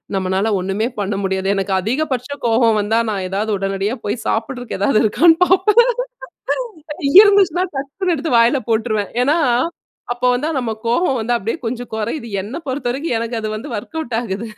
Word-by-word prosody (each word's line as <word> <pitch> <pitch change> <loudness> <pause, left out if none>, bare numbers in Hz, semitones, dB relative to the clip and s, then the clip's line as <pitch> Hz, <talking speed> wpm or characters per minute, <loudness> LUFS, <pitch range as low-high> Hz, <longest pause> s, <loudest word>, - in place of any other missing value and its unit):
நம்மனால 190 +3 0
ஒண்ணுமே 195 +5 -1
பண்ண 200 0 -1
முடியாது. 190 0 -1
எனக்கு 195 0 -1
அதிகபட்ச 255 +3 -2 0.2
கோவம் 230 -1 +3
வந்தா 220 +3 +1
நான் 195 -2 -3
எதாவது 205 +3 -2
உடனடியா 195 +3 -2
போய் 215 +2 -3
சாப்புடுறதுக்கு 240 0 -3
எதாவது 215 +2 +3
இருக்கான்னு 325 +10 +5
பார்ப்பேன். 425 +7 +4 1.1
இங்க 280 - +2
இருந்துச்சுன்னா 380 -4 +3
டக்குன்னு 335 +7 -2
எடுத்து 275 -4 0
வாயில 235 +4 +4
போட்ருவேன். 215 -2 0
ஏன்னா, 295 +6 +2 0.8
அப்ப 245 - -23
வந்து 275 +5 -1
நம்ம 240 -3 -3 0.2
கோவம் 260 +2 +1
வந்து 235 +2 0
அப்டியே 230 +9 -3
கொஞ்சம் 240 +1 -5
கொறையுது. 230 +4 -3
என்ன 215 +7 -7
பொறுத்த 260 -2 -2
வரைக்கும் 275 -1 -2
எனக்கு 230 0 -3
அது 215 - -3
வந்து 260 +7 -7
வொர்க் 265 +10 -6
அவுட் 240 -7 -3
ஆகுது. 225 -1 -4
230 Hz, 165 wpm, -18 LUFS, 210-280 Hz, 1.1 s, இருக்கான்னு